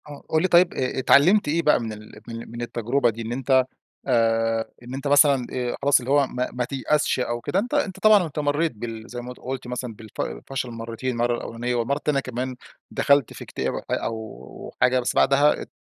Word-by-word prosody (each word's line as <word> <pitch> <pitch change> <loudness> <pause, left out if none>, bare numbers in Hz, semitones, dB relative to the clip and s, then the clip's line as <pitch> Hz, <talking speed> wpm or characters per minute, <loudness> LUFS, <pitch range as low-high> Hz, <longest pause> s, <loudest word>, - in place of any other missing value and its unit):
آه 145 - -10
قُل 155 - +2
لي 185 - +2
طيّب 175 0 +5
اتعلمت 140 +9 +3
إيه 160 +3 +1
بقى 150 - +4
من 115 -2 -4
ال 105 0 -12
من 115 -1 -8
من 120 0 -7
التجربة 120 +2 0
دي، 115 +1 -5
إن 115 0 -5
أنت 130 +1 +2 0.4
آآ 115 -2 +1
إن 125 +2 -8
أنت 135 +1 -5
مثلًا 140 -3 +5
آآ 125 -1 -2
خلاص 140 0 +5
اللي 125 +2 -5
هو 140 -1 +4
ما 125 0 -3
ما 125 0 -2
تيأسش 140 +2 0
أو 120 -1 -2
كده. 180 - -1
أنت 245 +8 -1
أنت 210 -11 0
طبعًا 215 -3 +6
أنت 155 -1 -8
مريت 150 +2 +1
بال 115 0 -7
زي 120 - -5
ما 125 +1 -7
قلت 130 0 -6
مثلًا 125 -1 -5
بالف 110 0 -10 0.3
فشل 130 -2 -4
مرّتين، 115 +2 -4
مرّة 120 +1 +1
الأولانية 120 +1 -4
والمرّة 120 +4 0
تانية 145 -2 +2
كمان، 130 0 -4 0.3
دخلت 140 -3 +2
في - - -9
اكتئاب - - -3 0.2
أو 110 - -5
حاجة 125 0 +4
بس 120 - -2
بعدها 145 +2 +4
ات - - -11
125 Hz, 205 wpm, -24 LUFS, 115-145 Hz, 0.4 s, طبعًا